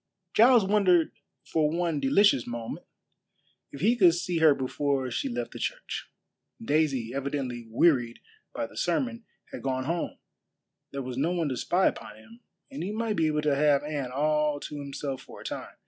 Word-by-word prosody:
Giles 235 -2 +6
wondered 190 -5 +3 0.3
for 155 -2 +1
one 165 -2 -1
delicious 140 - +3
moment 120 -1 -6 0.8
if 140 - -9
he 225 +6 +4
could 180 -7 +5
see 175 -1 -1
her 155 -3 +6
before 135 0 -1
she 275 - -2
left 245 0 -4
the - - -9
church. - - -4 0.5
Daisy, 145 - 0
evidently 135 -4 -3
wearied 120 -2 +2 0.3
by - - -3
the - - -14
sermon, 250 -5 -1 0.3
had - - -7
gone 130 -1 -1
home, 170 +5 -3 0.7
there 140 -1 -5
was 125 -1 -6
no 160 - +1
one 165 -4 0
to 130 - -2
spy 180 +9 +1
upon 105 - -2
him, 110 +2 -16 0.3
and 140 - -6
he 185 +4 -3
might 220 0 -1
be 160 -4 +2
able 150 -1 0
to 150 -1 +2
have 145 0 +3
Anne 145 -4 -3
all 150 +1 +1
to 150 - -6
himself 140 -1 -5
for - - -13
a - - -13
time. - - -6
150 Hz, 180 wpm, -28 LUFS, 135-175 Hz, 0.8 s, Giles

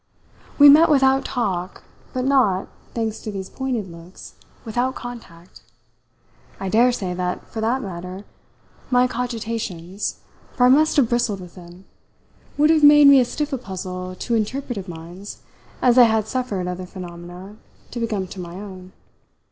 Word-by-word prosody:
We 290 - +9
met 310 +4 +8
without 270 -2 +3
talk, 190 -7 -3 0.3
but 255 0 -2
not, 250 -9 +2 0.3
thanks 225 -2 -2
to 215 - -5
these 190 -2 -7
pointed 245 -8 -3
looks, 170 +2 -13 0.3
without 245 +4 -1
contact. 205 -8 -10 1.0
I 195 - -3
daresay 225 -4 +2
that, 180 0 -3
for 220 - -4
that 240 +4 0
matter, 185 +1 -7 0.6
my 250 0 +4
cogitations 225 -7 -4 0.4
for 250 - +3
I - - +6
must 305 +4 +4
have 270 -5 +5
bristled 235 -4 0
with 180 -2 -11
them 180 +1 -14 0.7
would 300 +2 +4
have 315 -2 +3
made 290 -1 +8
me 280 -1 +8
as 245 - +2
stiff 300 +1 -3
a 265 - -1
puzzle 185 -3 -6
to 235 - -4
interpretative 225 -2 -2
minds 175 +4 -10 0.4
as 250 0 +5
I 245 - +9
had 220 -2 +1
suffered 220 -7 -3
other 180 0 -5
phenomena 180 +2 -10 0.3
to 240 - -5
become 215 -5 -2
to 190 - -9
my 170 0 -8
own. 185 -2 -10
215 Hz, 155 wpm, -22 LUFS, 185-250 Hz, 1.0 s, We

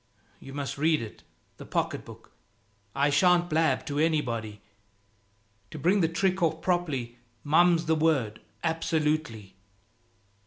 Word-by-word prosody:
You 135 - -11
must 140 -2 -4
read 155 0 +3
it, 110 -2 -9 0.4
the - - -10
pocket - - -2
book. - - -14 0.6
I 140 +1 +2
shan't 175 +4 +3
blab 155 -4 +1
to 145 -2 -3
anybody. 120 -10 -1 1.1
To 155 - -8
bring 180 +7 +2
the 165 - +3
trick 185 +3 0
off 160 -1 +1
properly, 145 -10 -2 0.2
mum's 165 +2 +4
the 160 - +2
word, 150 -9 +1 0.2
absolutely." 155 - -1
155 Hz, 125 wpm, -27 LUFS, 135-165 Hz, 1.1 s, mum's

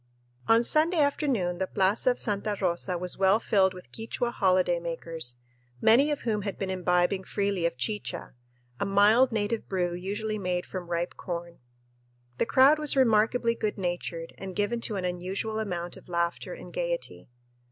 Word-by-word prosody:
On 225 +1 +5
Sunday 315 +7 +2
afternoon 270 - +1
the 190 - 0
plaza 200 +7 +2
of 245 - +1
Santa 205 -1 -1
Rosa 175 +1 0
was 180 +1 -2
well 195 +2 +4
filled 195 -4 +3
with 180 - -12
Quichua 230 +2 -3
holiday 185 -5 +2
makers, 165 -6 -4 0.4
many 245 - +5
of 295 - -2
whom 215 -3 -1
had 200 -1 -4
been 190 -1 -3
imbibing 180 +1 +1
freely 200 -4 0
of 150 - -6
chicha, 180 +5 -3 0.5
a - - 0
mild 210 +6 +5
native 220 0 -2
brew 180 -2 0
usually 205 +4 -3
made 180 -2 -2
from 180 -2 -7
ripe 175 0 -2
corn. 170 -1 -6 0.8
The - - +1
crowd 275 +5 +6
was 300 -2 +4
remarkably 230 -1 +3
good 215 -2 -3
natured 175 -3 -4
and 190 -2 -7
given 215 +3 -1
to 220 - -2
an 185 -2 -2
unusual 190 +5 -3
amount 175 -5 -4
of - - -16
laughter 170 0 -1
and - - -11
gayety. - - -4
195 Hz, 165 wpm, -28 LUFS, 180-225 Hz, 0.8 s, crowd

